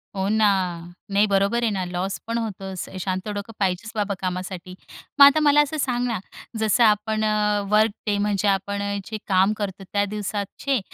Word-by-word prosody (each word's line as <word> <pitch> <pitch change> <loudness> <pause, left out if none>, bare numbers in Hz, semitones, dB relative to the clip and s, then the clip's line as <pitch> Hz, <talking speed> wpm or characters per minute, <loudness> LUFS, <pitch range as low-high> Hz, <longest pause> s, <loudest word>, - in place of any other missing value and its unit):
हो 190 0 -1
ना, 215 -1 +3 0.6
नाही, 205 +2 +3
बरोबर 200 +4 +2
आहे 225 - +2
ना, 190 -2 -2
लॉस 180 +2 -3
पण 230 +1 -1
होतो. 205 -4 -4
असं 185 +1 -7
शांत 185 +2 -3
डोकं 205 +3 -6
पाहिजे 190 +2 -1
बाबा 205 -1 -1
कामासाठी. 185 0 -5 0.4
मग 280 - +12
आता 285 +2 +6
मला 295 0 +6
असं 295 +1 -2
सांग 250 -4 0
ना, 230 -5 -2 0.4
जसं 220 +2 +3
आपण 215 0 +2
अ, 210 -1 +1
वर्क 215 +1 +4 0.2
डे 205 -1 +1
म्हणजे 205 0 0
आपण 200 +1 0
अ, 200 0 -2
जे 220 - -5
काम 190 +2 +3
करतो 195 -2 -4
त्या 200 +2 -1
दिवसाचे 210 +6 -2
205 Hz, 185 wpm, -23 LUFS, 195-220 Hz, 0.6 s, मग